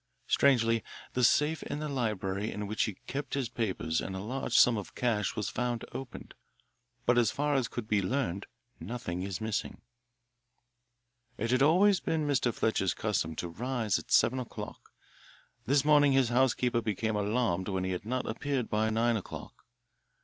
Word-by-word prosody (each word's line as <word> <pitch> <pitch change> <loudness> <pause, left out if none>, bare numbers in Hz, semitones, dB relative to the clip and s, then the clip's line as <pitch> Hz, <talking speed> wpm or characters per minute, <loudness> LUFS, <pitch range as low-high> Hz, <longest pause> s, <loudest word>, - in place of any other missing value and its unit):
Strangely, 115 -5 +3 0.3
the 125 - 0
safe 150 +5 +3
in - - -4
the 150 0 -3
library 105 -6 -2
in 105 0 -4
which 105 +2 0
he 105 - -4
kept 140 0 -4
his 135 -5 -1
papers 95 -9 -1
and 95 - -5
a - - -4
large 125 +7 -1
sum 120 - +6
of 105 -3 -6
cash 110 -5 0
was 105 -4 -2
found 120 -1 -2
opened, 135 -1 -8 0.7
but 120 0 +4
as 115 -3 +3
far 145 +4 0
as 130 -4 +1
could 120 -3 -6
be 105 -2 +2
learned 100 -2 -2 0.3
nothing 90 -2 -4
is 95 -1 -4
missing. 110 -1 -3 1.6
It 115 +2 -1
had 130 +1 +3
always 185 +6 +5
been 160 -2 -1
Mr. 130 -4 +2
Fletcher's 105 -5 0
custom 90 -7 -1
to 85 - -3
rise 115 +3 -1
at - - -13
seven 130 +3 +4
o'clock. 125 - -8 0.8
This 140 +2 +3
morning 145 -2 +5
his 135 -3 +3
housekeeper 125 -1 +2
became 110 0 -1
alarmed 105 -3 0
when 95 -2 -1
he 95 - -1
had 90 - -3
not 125 +3 -2
appeared 130 +1 -2
by 110 +1 +2
nine 115 +1 +2
o'clock. 100 - -9
115 Hz, 170 wpm, -30 LUFS, 105-130 Hz, 1.6 s, sum